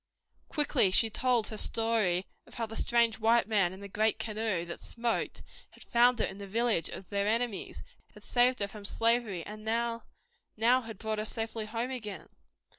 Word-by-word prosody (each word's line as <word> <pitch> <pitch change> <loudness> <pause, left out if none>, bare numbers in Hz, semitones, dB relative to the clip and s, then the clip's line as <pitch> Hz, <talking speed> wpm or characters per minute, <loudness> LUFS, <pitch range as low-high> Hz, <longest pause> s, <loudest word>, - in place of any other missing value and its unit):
Quickly 285 - +3
she 220 +4 +4
told 245 -2 +1
her 215 - -5
story 215 -6 +1 0.2
of - - -16
how 230 - -2
the 225 0 -9
strange 235 -1 +2
white 230 +1 +4
man 200 -5 +2
in 190 +1 -10
the 200 - -7
great 215 +2 +1
canoe 215 -5 -2
that 170 - -7
smoked 235 0 -3 0.3
had - - -16
found 240 +1 +4
her - - +1
in 190 - -7
the 200 - -7
village 225 -4 +1
of 185 - -8
their 200 0 0
enemies, 230 -1 -1 0.3
had - - -14
saved 245 -1 +2
her 200 - +1
from 205 0 -11
slavery, 225 -4 +1
and 215 0 -9
now, 230 +1 -1 0.6
had 230 -1 +2
brought 220 +1 -3
her - - 0
safely 225 0 -3
home 235 +3 -3
again. 215 -6 -6
225 Hz, 185 wpm, -30 LUFS, 205-235 Hz, 0.6 s, she